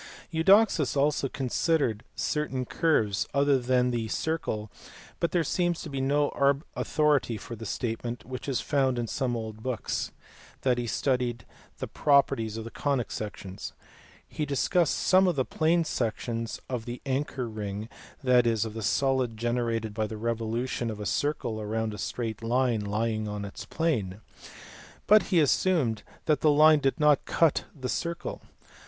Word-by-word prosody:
Eudoxus 170 - +4
also 140 -1 +2
considered 135 -3 0
certain 145 -4 -1
curves 110 -11 +1
other 140 -1 +4
than 125 0 +2
the 115 -2 -1
circle, 110 -7 -2 0.5
but 170 - +1
there 170 +1 +1
seems 175 +2 0
to 155 - -7
be 135 -1 -2
no 140 0 +2 0.2
authority 145 -7 +1
for 115 +3 -8
the 110 -1 -7
statement, 115 0 -3
which 130 +3 -6
is 130 - 0
found 135 -4 +1
in 120 - -1
some 125 +1 -1
old 110 -1 -6
books, 125 -3 -2 0.5
that 125 -2 +2
he 120 - -2
studied 125 -1 -1 0.3
the - - -4
properties 135 -6 +2
of 115 - -4
the 115 - -8
conic 140 -5 -1
sections. 100 -2 -6 0.5
He 155 - -4
discussed 150 +4 +1
some 190 0 +4
of 175 - +1
the 130 -2 +1
plane 165 +1 +2
sections 115 -4 -3
of 125 -3 -4
the 120 +1 -5
anchor 135 -2 -2
ring, 105 -1 -5 0.4
that 125 -2 +4
is, 115 -2 +1
of 110 - -6
the 110 - -5
solid 130 0 +1
gene 120 +2 0
rated 115 -2 -2
by 110 0 -1
the 110 - -6
revolution 115 +2 -2
of 110 -1 -5
a 105 - -5
circle 115 -5 -1
round 110 +1 -2
a 105 - -8
straight 115 -3 -3
line 120 -1 +1
lying 110 +1 -1
in 105 -1 -4
its 100 - -8
plane; 110 - -1 0.9
but 215 +1 +7
he 180 - +4
assumed 145 - +2 0.2
that 150 -3 +2
the 155 - +5
line 155 +1 +6
did 135 +2 0
not 150 -2 +4
cut 165 -4 +2
the 130 - -3
circle. 170 +6 -3
125 Hz, 160 wpm, -28 LUFS, 110-145 Hz, 0.9 s, but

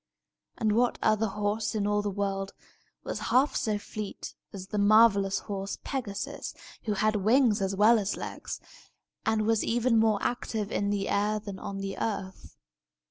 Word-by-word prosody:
And 220 -2 +1
what 240 +3 +2
other 215 0 +3
horse 210 +2 -1
in 205 -2 0
all 205 0 +2
the 205 - -2
world 195 0 -2 0.5
was - - -4
half 270 +4 +3
so 215 -2 0
fleet 205 0 -7 0.2
as 190 -1 -8
the 210 - -1
marvellous 200 -2 +5
horse 195 -1 -4
Pegasus, 225 -8 -4 0.3
who 215 - 0
had 215 +1 +1
wings 220 +1 +3
as 195 0 0
well 220 +3 +6
as 200 0 -2
legs, - - -6 0.7
and 220 -1 +2
was 225 -1 +2
even 235 0 +2
more 220 -2 +3
active 220 -3 -2
in 200 0 0
the 200 -1 -1
air 210 +1 +1
than 200 -2 -8
on 195 0 -5
the 195 0 -4
earth? 195 -4 -4
210 Hz, 165 wpm, -28 LUFS, 200-220 Hz, 0.7 s, well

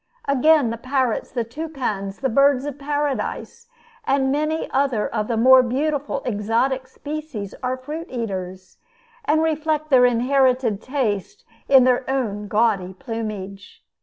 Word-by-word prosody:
Again, 280 -2 +4
the 230 - -5
parrots, 255 -2 -1
the 240 - -1
toucans, 230 -7 -4
the 265 - +1
birds 275 +2 +3
of 290 -1 -6
paradise, 290 -1 -3 0.4
and 270 -6 +1
many 305 +3 -1
other 265 -6 +1
of 215 -2 -2
the 230 - -1
more 260 +3 +7
beautiful 280 +2 -2
exotic 245 +4 0
species, 290 -7 -6
are 255 0 -2
fruit 305 +6 -7
eaters, 190 -6 -5 0.5
and 315 +2 +2
reflect 310 -1 -1
their 250 -2 +7
inherited 250 -2 +2
taste 255 - -3 0.2
in 265 -2 +7
their 250 0 +3
own 210 -6 -2
gaudy 200 -4 +1
plumage. 210 -4 -7
255 Hz, 135 wpm, -22 LUFS, 225-285 Hz, 0.5 s, more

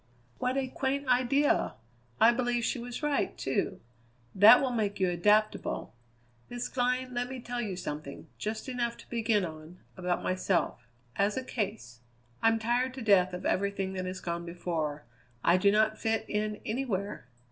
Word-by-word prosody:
"What 255 +2 0
a 270 -1 0
quaint 275 +2 -2
idea! 255 +3 +2 0.4
I 230 - +7
believe 240 -1 0
she 255 - -1
was 245 +4 -6
right, 295 -1 0
too. 135 - -1 0.5
That 215 +5 +9
will 265 -2 0
make 210 -4 -1
you 185 -2 +2
adaptable. 210 +5 +1 0.6
Miss 245 0 -3
Glynn, 255 0 0
let 245 0 -2
me 260 -1 -6
tell 240 0 -4
you 205 -5 -3
something, 150 -5 -6
just 215 +3 -4
enough 240 -2 -2
to - - -15
begin 225 -4 +1
on, 160 +1 -9 0.2
about 180 -1 -1
myself 185 - 0 0.3
as 200 +3 +1
a 260 - -1
case. 205 - -4 0.4
I'm 225 0 +4
tired 245 +3 0
to 260 - -6
death 190 -4 +4
of 180 - -6
everything 195 -1 0
that 185 -1 -3
has 185 0 -5
gone 170 0 -3
before; 165 -4 -3 0.4
I 175 - +5
do 200 +2 +4
not 215 +1 +2
fit 225 0 0
in 210 0 -2
anywhere. 210 - -3
215 Hz, 165 wpm, -30 LUFS, 185-245 Hz, 0.6 s, That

